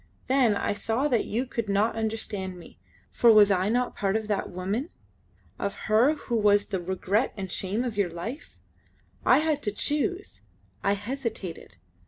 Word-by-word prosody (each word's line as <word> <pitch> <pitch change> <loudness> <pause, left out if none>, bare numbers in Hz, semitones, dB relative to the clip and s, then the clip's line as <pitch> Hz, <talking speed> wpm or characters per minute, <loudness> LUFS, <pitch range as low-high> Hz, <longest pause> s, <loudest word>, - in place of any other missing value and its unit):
Then 255 -5 +3
I 200 - 0
saw 225 +7 0
that 240 -5 +1
you 240 +5 -1
could 230 -4 -4
not 205 +3 +2
understand 215 -4 -3
me; 175 - -14 0.3
for 235 - +5
was 210 -2 +7
I 190 +1 +2
not 245 +2 0
part 195 0 0
of 220 -1 -1
that 205 - -1
woman? 195 - -3 0.7
Of 200 - -2
her 235 +8 +4
who 240 -5 -3
was 205 -1 +4
the 190 - -3
regret 190 +6 0
and 190 -2 -5
shame 200 +7 -1
of 235 -4 -4
your 200 -3 +2
life? 220 - -7 0.7
I - - +6
had 305 -2 +1
to 210 - -2
choose 300 - -2 0.4
I 200 - +3
hesitated. 210 - -5
215 Hz, 170 wpm, -27 LUFS, 200-245 Hz, 0.7 s, was